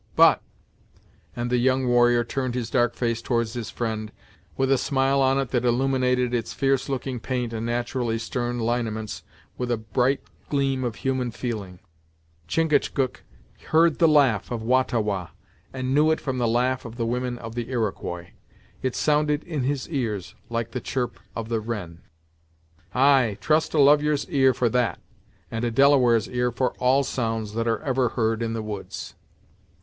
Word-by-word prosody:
But" -, -, +6 dB, 0.9 s
and 120 Hz, 0 st, -3 dB
the 125 Hz, -, +3 dB
young 130 Hz, +1 st, +2 dB
warrior 120 Hz, -1 st, +4 dB
turned 130 Hz, 0 st, -3 dB
his 120 Hz, -3 st, -3 dB
dark 120 Hz, -2 st, +2 dB
face 115 Hz, -2 st, -1 dB
towards 115 Hz, -2 st, -1 dB
his 120 Hz, -3 st, -4 dB
friend, 110 Hz, -2 st, -3 dB, 0.5 s
with 135 Hz, 0 st, +1 dB
a 135 Hz, -, +5 dB
smile 135 Hz, 0 st, +1 dB
on 135 Hz, 0 st, +3 dB
it 135 Hz, -3 st, -1 dB
that 125 Hz, 0 st, 0 dB
illuminated 125 Hz, 0 st, +1 dB
its 120 Hz, -2 st, -2 dB
fierce 135 Hz, 0 st, +1 dB
looking 130 Hz, -2 st, -3 dB
paint 125 Hz, 0 st, -3 dB
and 115 Hz, +1 st, -3 dB
naturally 120 Hz, -1 st, -1 dB
stern 120 Hz, +1 st, -3 dB
lineaments 115 Hz, -2 st, -2 dB, 0.4 s
with 125 Hz, -1 st, -2 dB
a 120 Hz, -, +1 dB
bright 125 Hz, +5 st, 0 dB, 0.3 s
gleam 135 Hz, -2 st, 0 dB
of 120 Hz, -3 st, -2 dB
human 130 Hz, -2 st, -1 dB
feeling, 110 Hz, -6 st, -5 dB, 0.7 s
"Chingachgook 145 Hz, -, +1 dB, 0.5 s
heard 165 Hz, 0 st, +4 dB
the 165 Hz, -, +6 dB
laugh 140 Hz, -, +3 dB
of 115 Hz, -2 st, -4 dB
Wah 130 Hz, +3 st, +4 dB
ta 125 Hz, -2 st, -1 dB
Wah, 100 Hz, -5 st, -2 dB, 0.4 s
and 130 Hz, 0 st, -2 dB
knew 150 Hz, +2 st, +4 dB
it 160 Hz, -, +2 dB
from 130 Hz, -2 st, -3 dB
the 120 Hz, -, +2 dB
laugh 125 Hz, +2 st, +1 dB
of 115 Hz, -1 st, -9 dB
the 120 Hz, -1 st, -2 dB
women 125 Hz, +1 st, -2 dB
of 115 Hz, -1 st, -8 dB
the 120 Hz, 0 st, -4 dB
Iroquois. 100 Hz, -7 st, -3 dB, 0.5 s
It 130 Hz, -1 st, -1 dB
sounded 150 Hz, 0 st, +1 dB
in 155 Hz, -5 st, -3 dB
his 135 Hz, +1 st, -1 dB
ears, 110 Hz, -, -3 dB, 0.2 s
like 115 Hz, 0 st, -2 dB
the -, -, -4 dB
chirp 125 Hz, -2 st, -3 dB, 0.2 s
of 115 Hz, -1 st, -4 dB
the 115 Hz, -1 st, 0 dB
wren." 105 Hz, -7 st, -6 dB, 0.9 s
"Ay, 130 Hz, -5 st, +4 dB
trust 155 Hz, +1 st, +1 dB
a -, -, +3 dB
lovyer's 145 Hz, +1 st, +4 dB
ear 135 Hz, -2 st, +5 dB
for 125 Hz, -, +2 dB
that, 120 Hz, 0 st, 0 dB, 0.5 s
and 115 Hz, +1 st, -3 dB
a 120 Hz, -, +1 dB
Delaware's 125 Hz, -3 st, +4 dB
ear 125 Hz, 0 st, 0 dB
for 125 Hz, +1 st, 0 dB
all 130 Hz, +2 st, +3 dB
sounds 115 Hz, -5 st, -2 dB
that 115 Hz, +1 st, -1 dB
are 115 Hz, +4 st, 0 dB
ever 130 Hz, -4 st, +1 dB
heard 115 Hz, -1 st, 0 dB
in 115 Hz, -1 st, -1 dB
the 115 Hz, -1 st, -3 dB
woods. 105 Hz, -2 st, -6 dB
125 Hz, 175 wpm, -25 LUFS, 115-135 Hz, 0.9 s, But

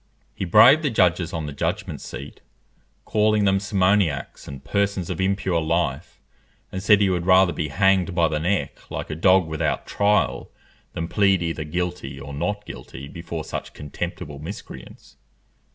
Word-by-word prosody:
He -, -, -4 dB
braved 115 Hz, -, +7 dB
the 150 Hz, -, 0 dB
judges 90 Hz, -5 st, +2 dB
on 80 Hz, -2 st, -4 dB
the 75 Hz, -, -6 dB
judgment 85 Hz, 0 st, -3 dB
seat, 70 Hz, +4 st, -9 dB, 0.6 s
calling 105 Hz, -1 st, +2 dB
them 95 Hz, 0 st, +3 dB
simoniacs 95 Hz, -6 st, 0 dB
and 70 Hz, -1 st, -9 dB
persons 100 Hz, -2 st, -1 dB
of -, -, -3 dB
impure 95 Hz, -3 st, 0 dB
life, 85 Hz, +2 st, -2 dB, 0.5 s
and 95 Hz, -, -4 dB
said 105 Hz, +1 st, +5 dB
he 100 Hz, -, +3 dB
would 90 Hz, -1 st, -2 dB
rather 95 Hz, -1 st, +5 dB
be 75 Hz, -, -2 dB
hanged 95 Hz, +3 st, +2 dB
by 85 Hz, -2 st, +3 dB
the 75 Hz, 0 st, -2 dB
neck 90 Hz, +5 st, -2 dB
like -, -, -5 dB
a -, -, -3 dB
dog 95 Hz, +2 st, +4 dB
without 80 Hz, -1 st, -2 dB
trial, 105 Hz, +1 st, +1 dB, 0.4 s
than 80 Hz, -, -3 dB
plead 95 Hz, -2 st, +2 dB
either 80 Hz, -2 st, -3 dB
guilty 90 Hz, -4 st, -4 dB
or 70 Hz, +1 st, -8 dB
not 105 Hz, +8 st, -3 dB
guilty 70 Hz, -8 st, -9 dB
before 85 Hz, +1 st, -6 dB
such -, -, -6 dB
contemptible 75 Hz, 0 st, -6 dB
miscreants. 75 Hz, -, -10 dB
90 Hz, 160 wpm, -23 LUFS, 80-100 Hz, 0.6 s, braved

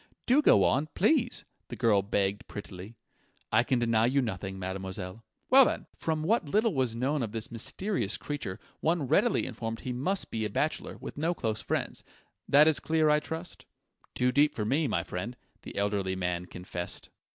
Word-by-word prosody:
"Do 265 Hz, +5 st, +5 dB
go -, -, +6 dB
on 145 Hz, +4 st, +2 dB
please!" 245 Hz, -, +2 dB, 0.2 s
the -, -, -6 dB
girl 110 Hz, -5 st, +3 dB
begged 100 Hz, 0 st, -1 dB
prettily. 100 Hz, +2 st, -8 dB, 0.6 s
"I 110 Hz, -, +5 dB
can 125 Hz, +1 st, +1 dB
deny 115 Hz, -1 st, +3 dB
you 135 Hz, +3 st, +2 dB
nothing, 95 Hz, -5 st, -3 dB
mademoiselle.... 95 Hz, +2 st, -5 dB, 0.3 s
Well, 270 Hz, +1 st, +9 dB
then! -, -, -2 dB
From 155 Hz, -1 st, -2 dB
what 185 Hz, -3 st, +1 dB
little 215 Hz, +4 st, +2 dB
was 130 Hz, -5 st, 0 dB
known 135 Hz, +5 st, 0 dB
of 110 Hz, -3 st, -3 dB
this 115 Hz, -1 st, -4 dB
mysterious 130 Hz, -, -1 dB
creature, 140 Hz, -9 st, -5 dB, 0.2 s
one 160 Hz, -3 st, +1 dB
readily -, -, +3 dB
inferred 115 Hz, 0 st, -5 dB
he 125 Hz, -, -3 dB
must 180 Hz, +11 st, -2 dB
be 110 Hz, -1 st, -2 dB
a 105 Hz, -, -1 dB
bachelor, 150 Hz, +9 st, -2 dB
with -, -, -8 dB
no 165 Hz, +3 st, +1 dB
close 110 Hz, -7 st, -2 dB
friends. -, -, -2 dB, 0.5 s
That 150 Hz, +2 st, +7 dB
is 160 Hz, -, +4 dB
clear, 160 Hz, -1 st, +2 dB
I 150 Hz, -, +4 dB
trust?" 160 Hz, +3 st, -7 dB, 0.5 s
"Too 125 Hz, 0 st, +2 dB
deep 145 Hz, +3 st, +3 dB
for 105 Hz, -, -2 dB
me, 145 Hz, +7 st, +1 dB
my 110 Hz, -, 0 dB
friend," 110 Hz, +8 st, -5 dB, 0.2 s
the -, -, -9 dB
elderly 100 Hz, -2 st, 0 dB
man 90 Hz, -1 st, -2 dB
confessed. 90 Hz, -1 st, -5 dB
120 Hz, 180 wpm, -29 LUFS, 100-155 Hz, 0.6 s, Well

